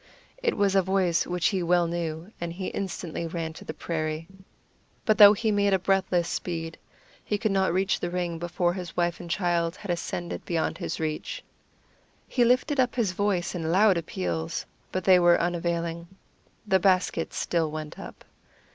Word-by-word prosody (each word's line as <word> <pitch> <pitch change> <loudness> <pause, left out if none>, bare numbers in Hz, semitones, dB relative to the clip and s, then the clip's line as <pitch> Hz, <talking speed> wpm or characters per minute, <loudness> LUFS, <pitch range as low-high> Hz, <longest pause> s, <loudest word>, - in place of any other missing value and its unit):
It 470 -2 0
was 200 -1 +2
a 195 - +5
voice 185 -3 +1
which 180 -1 +1
he 190 -3 -1
well 175 0 +3
knew, 170 +2 -4
and 170 -1 -3
he 185 +1 -4
instantly 175 -3 -4
ran 165 -1 -4
to - - -11
the - - -5
prairie. 155 0 -3 0.8
But 215 -3 +2
though 205 -1 +11
he 220 +1 0
made 200 -1 +3
breathless 190 -3 +2
speed, 165 -2 -4 0.4
he 210 - -1
could 215 0 0
not 190 -2 +2
reach 190 +3 +1
the 175 - -2
ring 175 -2 -2
before 175 +1 0
his 180 -2 -7
wife 175 -1 0
and 175 - -8
child 170 -1 0
had 200 - -5
ascended 175 0 -4
beyond 165 0 -1
his 175 - -4
reach. 155 -1 -3 0.8
He 245 - +2
lifted 255 +4 +2
up 250 -1 +2
his 225 -7 +1
voice 185 -2 0
in 165 -3 -2
loud 195 +2 +5
appeals, 90 - -3 0.3
but 185 - -2
they 185 -1 +6
were 175 0 +5
unavailing. 170 -1 -2 0.6
The 190 -1 +4
basket 185 -3 +1
still 165 -3 0
went 155 0 -7
up. - - -10
175 Hz, 175 wpm, -27 LUFS, 165-195 Hz, 0.8 s, though